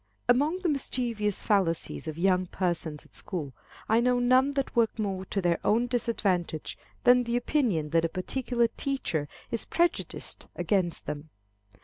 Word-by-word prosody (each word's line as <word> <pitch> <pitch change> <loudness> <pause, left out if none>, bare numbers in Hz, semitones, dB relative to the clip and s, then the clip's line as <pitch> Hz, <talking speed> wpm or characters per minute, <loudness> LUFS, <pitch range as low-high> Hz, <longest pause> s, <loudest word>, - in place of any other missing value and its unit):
Among 290 +8 +3
the 350 - +2
mischievous 235 -7 0
fallacies 175 -5 0
of 155 0 -4
young 185 +1 +2
persons 170 -5 -2
at - - -22
school, 155 -8 -5 0.3
I 220 +1 +4
know 250 +1 +3
none 255 +2 +4
that 275 -1 -2
work 230 -2 +2
more 195 -3 -2
to 195 0 -2
their 175 -1 +2
own 230 +3 +3
disadvantage 200 -9 -1 0.3
than 245 0 +6
the 235 +1 0
opinion 230 - 0
that 165 0 +3
a - - 0
particular 235 +6 0
teacher 225 - -2 0.2
is 230 - 0
prejudiced 345 0 -1
against 185 -5 0
them. 150 +1 -5
210 Hz, 150 wpm, -28 LUFS, 175-245 Hz, 0.3 s, than